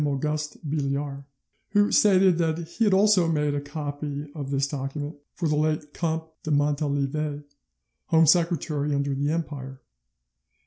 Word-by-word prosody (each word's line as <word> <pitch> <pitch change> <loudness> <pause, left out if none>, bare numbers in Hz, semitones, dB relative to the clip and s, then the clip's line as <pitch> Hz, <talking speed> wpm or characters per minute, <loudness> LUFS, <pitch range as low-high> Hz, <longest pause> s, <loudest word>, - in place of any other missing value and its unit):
Auguste 150 +2 -2
Billiard, 140 -1 -2 0.5
who 205 0 +4
stated 190 -4 +5
that 160 -1 +1
he 225 +7 0
had 205 - +3
also 195 -3 +4
made 150 -2 +1
a 145 - -1
copy 145 0 -5
of 145 -4 -5
this 140 0 +1
document 145 +2 -4 0.2
for 170 - -1
the 150 - +1
late 150 -1 -1
Comte 160 -1 -2
de - - -6
Montalivet, 145 0 0 0.6
Home 165 -1 +5
Secretary 155 -3 +2
under 140 0 0
the 140 +2 -1
Empire. 140 -5 -4
150 Hz, 140 wpm, -26 LUFS, 145-160 Hz, 0.6 s, stated